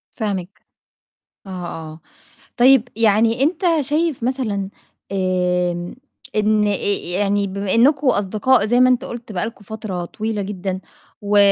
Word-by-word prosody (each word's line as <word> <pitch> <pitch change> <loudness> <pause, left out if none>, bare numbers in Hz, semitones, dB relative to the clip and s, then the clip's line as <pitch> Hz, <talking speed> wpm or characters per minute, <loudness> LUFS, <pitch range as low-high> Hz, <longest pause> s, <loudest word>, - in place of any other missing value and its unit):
فاهماك. 200 -4 -4 0.9
آه، - - -9 0.2
آه. 160 -1 -7 0.6
طيب 250 -1 +5
يعني 225 +3 +3
أنت 335 +6 0 0.2
شايف 295 -2 -1
مثلًا 220 -7 -1 0.4
آمم، 180 -2 0 0.4
إن 210 0 +2
أ - - +2
أ - - 0 0.4
يعني 200 0 +1
بما 200 0 -3
إنّكم 275 +4 +4
أصدقاء 215 +2 +2
زي 240 +3 +2
ما 255 0 +6
أنت 250 - +2
قُلت 235 -2 -8
بقى 190 +2 -2
لكم 225 -2 -9
فترة 200 -5 -5
طويلة 215 +2 -3
جدًا 190 -1 -4 0.4
و 205 0 +1
210 Hz, 135 wpm, -20 LUFS, 190-240 Hz, 0.9 s, ما